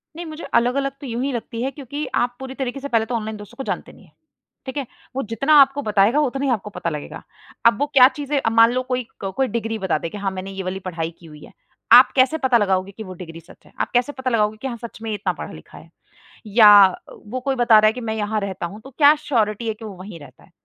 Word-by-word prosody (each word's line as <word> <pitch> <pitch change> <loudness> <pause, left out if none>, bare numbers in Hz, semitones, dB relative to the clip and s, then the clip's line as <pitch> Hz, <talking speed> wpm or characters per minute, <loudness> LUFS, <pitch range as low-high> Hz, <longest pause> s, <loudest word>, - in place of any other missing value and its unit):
नहीं 345 +1 -6
मुझे 315 0 -8
अलग-अलग 275 +3 +1
तो 280 - -7
यूँ 235 0 -3
ही 280 - -1
लगती 230 0 -5
हैं 265 - -2
क्योंकि 285 +1 -6
आप 245 0 0
पूरी 265 0 -7
तरीके 265 0 -4
से 280 - -5
पहले 230 -4 +1
तो 245 - -3
ऑनलाइन 220 -1 -4
दोस्तों 210 +3 -12
को 270 - -4
जानते - - -4
नहीं - - -18
हैं। - - -26 0.5
ठीक 260 +1 -6
है? 280 - -2 0.3
वो 270 - -1
जितना 250 +7 0
आपको 275 +1 +3
बताएगा, 215 +4 +2
उतना 275 -1 -1
ही 270 - +1
आपको 210 -3 -2
पता 175 - -4
लगेगा। 150 -2 -7 0.4
अब 230 0 +5
वो 290 - +2
क्या 255 -2 +8
चीज़ें 290 -1 -1
अब 225 - -1
मान 230 +1 +6
लो 255 +1 -1
कोई, 255 -1 -2 0.2
क 195 -1 -3
कोई 265 - +2
डिग्री 225 -2 -3
बता 190 -5 0
दे 165 - -5
कि 205 - -8
हाँ 195 -1 -2
मैंने 190 +1 -6
ये 195 0 -6
वाली 185 +1 -4
पढ़ाई 170 -3 -4
की 170 - -16
हुई 150 -2 -13
है। - - -14 0.4
आप 250 +2 +9
कैसे 260 +4 +3
पता 260 -4 +3
लगाओगे 195 -2 0
कि 220 - -6
वो 185 -3 -9
डिग्री 165 -2 -10
सच 170 +2 -19
है? - - -20
आप - - -2
कैसे 245 +4 +2
पता 260 -2 -3
लगाओगे 215 -1 +1
कि 270 - -3
हाँ 235 - -5
सच 230 -1 -9
में 225 - -5
ये 215 - -1
इतना - - -2
पढ़ा-लिखा - - -10
है? - - -15 0.6
या 210 -2 +8 0.4
वो 255 +5 -5
कोई 270 +1 -1
बता 235 -3 +5
रहा 215 - +5
है 215 - +4
कि 250 - -7
मैं 220 -2 -3
यहाँ 215 0 -1
रहता 190 -3 -4
हूँ 205 +5 -10
तो 270 - -11
क्या 290 0 +7
श्योरिटी 225 -5 0
है 220 - -1
कि 220 - -13
वो 210 - -7
वहीं 185 -2 -10
रहता 145 - -16
है? - - -22
230 Hz, 275 wpm, -21 LUFS, 205-265 Hz, 0.6 s, आप